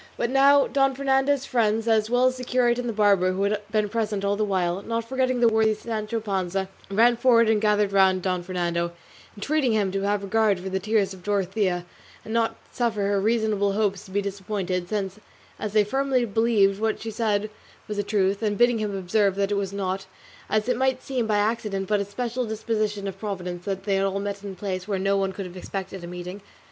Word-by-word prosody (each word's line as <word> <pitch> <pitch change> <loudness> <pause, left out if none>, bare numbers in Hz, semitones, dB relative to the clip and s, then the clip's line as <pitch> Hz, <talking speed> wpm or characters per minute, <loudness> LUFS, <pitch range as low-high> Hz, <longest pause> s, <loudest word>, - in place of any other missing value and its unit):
But 240 - -1
now 275 +1 +6
Don 270 -1 +1
Fernando's 270 0 +1
friends, 225 -2 +1
as 220 -1 +2
well 245 +1 +3
as 255 0 +2
the 255 - -6
curate 245 -1 +2
and 245 -1 -2
the - - 0
barber, 200 -4 +3
who 195 +2 -1
had 205 +1 0
been 215 -1 +1
present 210 -2 -2
all 200 0 +1
the 215 - 0
while, 185 -2 0
not 230 +2 -3
forgetting 255 -1 0
the 235 - +6
worthy 220 -1 +3
Sancho 220 0 -3
Panza, 190 -2 -2 0.2
ran 230 +4 +4
forward 230 -1 +4
and 220 -1 +2
gathered 210 -1 +2
round 190 -2 +3
Don 185 -2 0
Fernando, 170 -1 -2 0.4
entreating 275 +2 +1
him 205 -3 +1
to 195 +1 -2
have 200 0 0
regard 205 -1 +2
for 190 +1 -5
the 190 0 -1
tears 210 -1 +1
of 185 - -12
Dorothea, 190 -2 0 0.4
and 220 - -5
not 230 -1 +1 0.2
suffer 230 -4 -1
her 200 0 +1
reasonable 215 -2 +1
hopes 200 -2 0
to - - -14
be 200 +1 -1
disappointed, 190 -2 -3
since, 200 -1 -3 0.4
as 210 -1 -4
they 215 -1 +5
firmly 265 +2 +1
believed, 210 -2 +2
what 220 -1 0
she 225 - -5
said 210 -2 0 0.4
was 210 - -4
but - - -8
the 205 - -2
truth; 200 -1 +1
and 210 -2 0
bidding 240 -1 +4
him 205 -2 -2
observe 195 +1 +1
that 200 0 0
it - - +2
was 200 -1 -2
not, 190 -1 -3 0.4
as 215 +1 +1
it 250 -2 +1
might 260 0 0
seem, 250 -4 -2
by 210 -1 +2
accident, 210 -2 -1
but 210 - +2
by - - -1
a - - -2
special 240 +4 -3
disposition 215 -2 -2
of 195 0 -6
Providence 180 -4 -5
that 195 -1 -3
they 200 -1 +1
had 195 - +1
all 195 0 -1
met 200 0 -4
in 200 -1 -6
a - - -13
place 185 -1 -4
where 200 -2 -1
no 195 +1 +1
one 195 -1 0
could 195 0 -6
have 180 0 -9
expected 190 0 -6
a - - -6
meeting. 180 +3 -7
205 Hz, 225 wpm, -25 LUFS, 195-225 Hz, 0.4 s, now